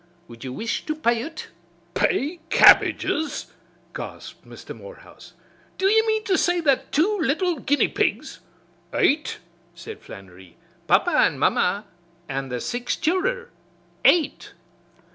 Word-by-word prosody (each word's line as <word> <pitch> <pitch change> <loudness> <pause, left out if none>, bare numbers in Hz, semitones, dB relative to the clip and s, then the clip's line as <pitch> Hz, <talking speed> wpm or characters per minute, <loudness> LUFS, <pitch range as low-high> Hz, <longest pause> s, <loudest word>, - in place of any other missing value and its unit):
Wud 115 -1 -12
you 130 - -5
wish 225 - -3
to 310 - -1
pay 235 -6 +1
ut?" 320 +2 -8 0.4
"Pay 345 -2 0
Cabbages 305 -1 +4 0.2
!" - - -35
gasped - - -9
Mr. - - -10
Morehouse. - - -14 0.4
"Do 380 - -1
you 445 +3 +4
mean 435 0 +1
to 385 -4 +1
say 355 0 +1
that 280 -6 +1
two 395 +8 +1
little 330 +1 0
guinea 290 +3 +2
pigs - - -2 0.3
" - - -33
"Eight!" 300 +2 +1 0.4
said 170 - -9
Flannery. 95 -2 -14 0.3
"Papa - - +3
an' - - +3
mamma 200 +4 +1 0.4
an' 135 -1 -4
the 125 -1 -3
six 245 - -3
childer. 470 +9 -1 0.5
Eight!" 320 -5 +2
305 Hz, 135 wpm, -23 LUFS, -, 0.5 s, Cabbages